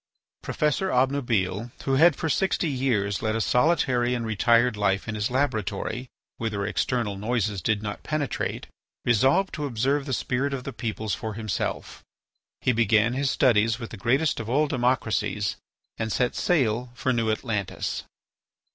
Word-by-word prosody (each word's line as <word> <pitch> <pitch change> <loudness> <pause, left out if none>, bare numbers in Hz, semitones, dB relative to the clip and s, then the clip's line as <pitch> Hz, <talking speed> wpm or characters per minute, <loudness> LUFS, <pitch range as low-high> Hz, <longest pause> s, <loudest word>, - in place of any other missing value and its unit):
Professor 150 +6 0
Obnubile, 120 - 0
who 135 - 0
had 165 +6 +6
for 160 - -3
sixty 180 +2 +1
years 120 -8 0
led 110 0 0
a - - 0
solitary 125 -2 +2
and 120 -1 -3
retired 115 +2 +3
life 100 0 0
in 110 - -3
his 105 0 -1
laboratory, 125 -2 -1 0.3
whither 110 -3 -2
external 105 0 -1
noises 105 -2 -1
did 105 +4 0
not 105 -1 -5
penetrate, 155 -3 -2 0.4
resolved 135 - +3
to 150 -1 -3
observe 135 +4 0
the - - -3
spirit 135 +3 -1
of 130 - -6
the 140 - -6
peoples 110 -2 -3
for 110 -2 -4
himself. 110 -2 -3 0.6
He 125 - +3
began 110 0 +3
his 135 +1 0
studies 115 -5 +3
with 115 -2 -7
the - - -6
greatest 135 +9 +1
of 115 -1 -5
all 145 +5 +3
democracies 120 -6 0 0.4
and 110 0 -2
set 125 +2 +1
sail 125 -7 +1
for 130 +1 0
New 115 -2 0
Atlantis. 110 -3 -2
120 Hz, 155 wpm, -26 LUFS, 110-135 Hz, 0.6 s, had